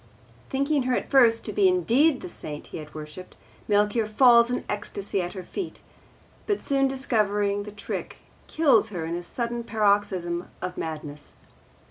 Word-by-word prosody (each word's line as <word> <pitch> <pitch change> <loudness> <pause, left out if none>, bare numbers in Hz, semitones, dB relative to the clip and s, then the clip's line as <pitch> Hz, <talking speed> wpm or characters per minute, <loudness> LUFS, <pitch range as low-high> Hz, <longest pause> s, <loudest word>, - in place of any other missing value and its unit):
Thinking 280 +2 +1
her 250 - +3
at - - -3
first 235 -5 +5
to - - -4
be 400 -2 +4
indeed 315 -5 +3
the - - -6
Saint 150 -3 -8
he - - -7
had 150 0 -11
worshipped, 155 +4 -9 0.3
Melchior 210 +2 +2
falls 235 +1 +6
in 250 - -2
ecstasy 200 -1 -3
at 175 0 -4
her 190 -2 -7
feet, 360 - -6 0.7
but 410 -2 +1
soon 275 -1 +1
discovering 210 -6 0
the 210 +1 -8
trick 205 0 -6 0.3
kills 270 -9 +3
her 175 -6 -4
in 165 - -4
a 175 - -3
sudden 235 +6 -3
paroxysm 200 -5 0
of 180 0 -5
madness. 150 -2 -6
210 Hz, 160 wpm, -26 LUFS, 180-255 Hz, 0.7 s, falls